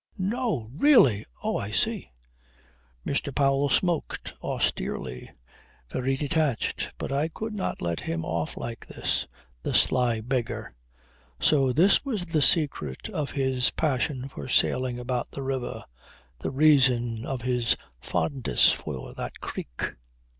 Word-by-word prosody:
"No! 195 - -1
Really! 145 - +5 0.2
Oh - - 0
I - - -3
see!" - - 0 1.0
Mr. 140 0 -1
Powell 140 0 +3
smoked 175 -1 0
austerely, 65 0 -2 0.6
very 135 +1 0
detached. 145 -3 0
But - - -4
I 140 +3 +1
could 220 +7 -5
not 200 - -3
let 85 -1 -1
him 80 0 -3
off 80 0 -2
like 115 -1 -6
this. - - -1 0.3
The - - -2
sly 120 -3 +3
beggar. 120 - -3 0.7
So 135 -4 +4
this 175 +10 +4
was 225 -10 -2
the 165 -3 +1
secret 140 - +2
of 145 -2 -2
his 130 -2 +1
passion 135 -3 -1
for 70 - -8
sailing 125 -1 +2
about 125 0 -2
the 140 - -6
river, 130 -2 -3 0.6
the - - -2
reason 125 -5 +4
of 130 -3 -4
his 125 -2 +2 0.2
fondness 120 - +2
for 65 -5 -5
that - - -6
creek. - - -5
130 Hz, 130 wpm, -27 LUFS, 115-150 Hz, 1.0 s, Really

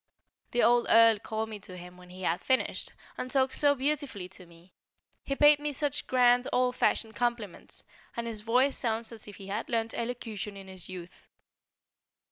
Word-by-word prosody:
The 240 - +1
old 240 0 +4
Earl 230 -2 +6
called 220 +1 -3
me 215 -1 -7
to 185 -2 -8
him 180 0 -11
when 180 0 -15
he 185 +1 -10
had 170 0 0
finished, 260 -1 0 0.3
and 255 - -3
talked 265 -1 +2
so 285 -1 +4
beautifully 275 - -2
to 185 -1 -11
me; 170 +2 -19 0.5
he 275 - -2
paid 295 +1 +6
me 295 0 -2
some 290 +1 0
such 290 - -2
grand 245 -1 +4
old 250 0 +2
fashioned 220 -3 0
compliments, 235 -6 -3 0.3
and 235 - -2
his 225 -2 -5
voice 250 +5 +2
sounds 230 -1 -1
as 225 -2 -9
if 205 - -9
he 195 - -11
had 205 +4 -4
learnt 225 -1 0
elocution 225 -4 -4
in 195 -1 -10
his 190 -1 -6
youth. 180 -1 -10
230 Hz, 190 wpm, -29 LUFS, 195-255 Hz, 0.5 s, Earl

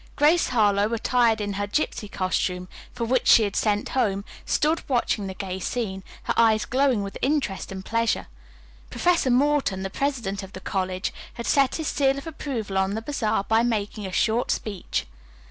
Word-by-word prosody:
Grace 310 +4 +4
Harlowe, 210 -3 +2
attired 230 -1 +2
in 205 -1 -2
her 205 +1 -2
gypsy 210 -3 -2
costume, 180 -1 -1 0.2
for 235 - -3
which 255 +2 +1
she 225 - +7
had 200 -2 -2
sent 210 -1 +1
home, 200 -6 0 0.2
stood 310 +2 +2
watching 235 -5 0
the 190 - -6
gay 190 -1 -4
scene, 190 -2 -3 0.2
her - - 0
eyes 220 -2 +4
glowing 260 -5 +2
with 195 - -6
interest 270 -11 -1
and 190 0 -7
pleasure. 230 0 0 0.6
Professor 345 -6 +2
Morton, 260 -7 +2
the 195 - -4
president 235 -8 -2
of 195 0 -10
the 185 - -7
college, 185 0 -2 0.2
had 235 - -5
set 275 -2 +3
his 320 -2 -3
seal 275 -1 +2
of 275 - -7
approval 245 -11 -3
on 190 +1 0
the 220 - -3
bazaar 220 -7 0
by 220 +2 +3
making 215 -3 -1
a - - -7
short 230 +5 +1
speech. 200 -4 -2
220 Hz, 180 wpm, -25 LUFS, 195-260 Hz, 0.6 s, she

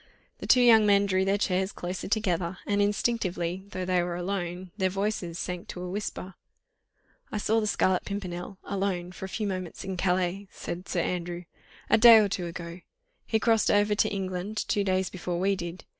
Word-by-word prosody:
The - - -6
two 250 - +6
young 225 -3 +7
men 200 0 +5
drew 190 -1 +1
their 195 +1 +2
chairs 190 -1 0
closer 180 +1 -5
together, 190 -4 0
and 205 0 +1
instinctively, 195 -4 -1
though 185 -2 -4
they 180 -1 +2
were 175 0 -2
alone, 180 0 -4
their 190 -3 +1
voices 195 -3 -2
sank 180 -1 -4
to 180 - -7
a 180 - -5
whisper. 195 -1 -5 1.0
"I - - -2
saw 220 +2 +2
the 215 - -1
Scarlet 185 -3 +2
Pimpernel 190 -1 -5
alone, 190 -3 -2
for 185 - -7
a - - -7
few 215 +3 -3
moments 185 -3 -4
in 190 -1 -4
Calais," 185 +2 0
said 180 +2 -7
Sir 175 - 0
Andrew, 175 0 -3 0.4
"a - - +4
day 230 0 +10
or 215 -2 +4
two 180 -2 -3
ago. 170 +1 -7 0.5
He 220 - +2
crossed 225 -1 +3
over 205 0 +3
to 205 - +2
England 190 +1 -3
two 205 - +1
days 190 -1 0
before 175 -1 -3
we 195 +2 +2
did. 175 -1 -7
190 Hz, 190 wpm, -28 LUFS, 180-205 Hz, 1.0 s, day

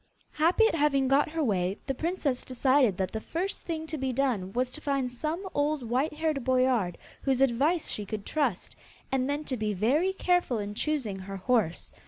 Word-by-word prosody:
Happy 340 +8 +3
at - - -1
having 285 -4 +2
got 275 +3 +3
her 320 0 -1
way, 190 -5 0
the 270 - -1
princess 305 -3 -1
decided 255 -5 +2
that 190 -1 -1
the 220 - -4
first 365 - -3
thing 320 -2 -3
to 315 -1 -5
be 265 0 -1
done 240 -8 0
was 250 +3 0
to 310 - -5
find 275 -4 -1
some 315 +9 -3
old 290 -1 0
white 250 +6 0
haired 310 -4 -1
boyard, 255 -8 +2 0.2
whose 265 -2 +1
advice 270 +6 +2
she 210 - -3
could 205 0 -5
trust, 270 - -1 0.4
and 265 0 +1
then 290 +1 -1
to 265 - -3
be 215 -3 -1
very 280 - +2
careful 355 -9 +1
in 205 -1 -4
choosing 235 -6 -2
her 195 +1 -6
horse. 205 -5 0
265 Hz, 195 wpm, -28 LUFS, 220-305 Hz, 0.4 s, Happy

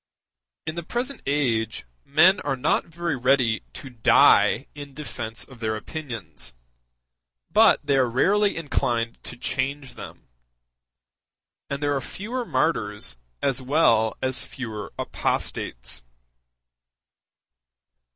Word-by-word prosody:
In 160 - -2
the 170 - -4
present 250 - -3
age 115 - 0 0.2
men 175 +7 +5
are - - -1
not 130 +4 +1
very 170 -2 -2
ready 125 -3 +3
to 135 - -8
die 115 -3 +5
in 145 -2 -9
defence 115 -8 -5
of 130 +1 -15
their 110 -1 -1
opinions, 105 - -6 1.0
but - - +5
they 140 - +3
are 130 -2 +3
rarely 200 - +3
inclined 120 -7 -1
to 120 - -7
change 135 +2 -2
them; - - -11 1.4
and 140 +1 -3
there 145 0 +2
are 135 - -1
fewer 235 - -4
martyrs 105 - -1 0.3
as 135 -1 +1
well 125 -6 +3
as 130 0 -1
fewer 110 -5 -6
apostates. - - -2
130 Hz, 110 wpm, -25 LUFS, 115-150 Hz, 1.4 s, men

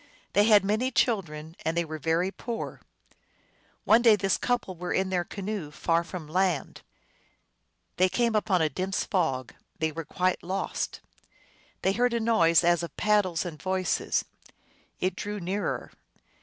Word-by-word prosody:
They 205 +1 +5
had 210 -3 +6
many 220 +6 +1
children, 165 -11 -1
and 160 +1 -1
they 170 - +1
were 155 0 -6
very 165 +5 +1
poor. 230 +2 -6 1.0
One 230 - +5
day 230 -3 +7
this 195 -1 +1
couple 245 -6 -1
were 175 +1 -5
in 190 0 0
their 180 -2 +1
canoe, 200 -4 -5
far 165 +2 0
from 170 -3 -7
land. 180 -1 0 1.2
There 185 +1 +4
came 235 +2 +1
up 215 +1 0
a 180 -5 +3
dense 185 +6 -2
fog; 135 - -1 0.2
they 160 0 0
were 165 +2 -5
quite 185 +3 0
lost. 190 +3 -3 0.8
They 190 - +3
heard 245 +2 +1
a - - +1
noise 175 -8 +4
as 175 0 +3
of 170 - -7
paddles 195 -5 +2
and 155 -4 -7
voices. 185 -1 0 0.7
It 185 0 0
drew 205 +1 -4
nearer. 190 +3 -3
185 Hz, 155 wpm, -27 LUFS, 165-210 Hz, 1.2 s, day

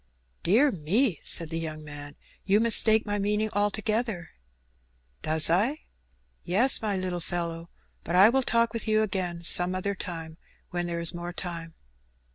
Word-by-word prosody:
"Dear 245 - +3
me!" 190 - 0
said 165 -1 +3
the 165 - -3
young 155 -1 -6
man, 145 -1 -10 0.3
"you 200 +2 +2
mistake 220 -1 +4
my 205 -1 -2
meaning 210 +2 0
altogether." 210 -1 -2 0.9
"Does 155 0 +2
I?" 215 - +1 0.6
"Yes, 235 +10 +3
my 210 -3 -2
little 185 -1 -3
fellow. 170 -1 -5 0.3
But 170 - -3
I 195 +4 +7
will 265 +3 +2
talk 235 -2 +1
with 230 -1 -5
you 215 0 +2
again 180 -4 -3
some 180 +2 +3
other 200 +2 -2
time, 165 -4 -7 0.3
when 175 0 -3
there 170 -1 -3
is 170 -1 -1
more 175 0 -6
time." 170 -2 -6
185 Hz, 155 wpm, -26 LUFS, 170-215 Hz, 0.9 s, I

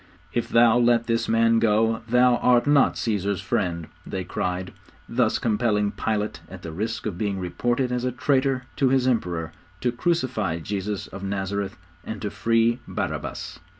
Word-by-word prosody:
'If 120 - -1
thou 115 0 +5
let 120 -1 +3
this 115 -1 0
Man 115 0 +4
go, 110 +1 +2
thou 125 0 +5
art 125 -1 +4
not 145 -1 +4
Caesar's 100 -3 -1
friend,' 90 -8 -1 0.2
they 95 - -4
cried, 90 0 -3 0.3
thus 120 -2 +1
compelling 105 -3 +1
Pilate, 105 -1 -2
at - - -10
the 80 - -5
risk 110 +7 -3
of 100 -5 -3
being 100 -2 -1
reported 120 +8 -1
as 125 0 -1
a 125 - 0
traitor 130 0 +1
to 135 -3 +3
his 130 -1 +2
Emperor, 90 -10 0 0.3
to 125 - +1
crucify 125 - 0
Jesus 100 +3 -3
of 95 - -9
Nazareth, 100 0 -3 0.3
and 110 - -6
to 105 - -2
free 115 +1 +2
Barabbas. - - -4
115 Hz, 160 wpm, -24 LUFS, 100-120 Hz, 0.3 s, thou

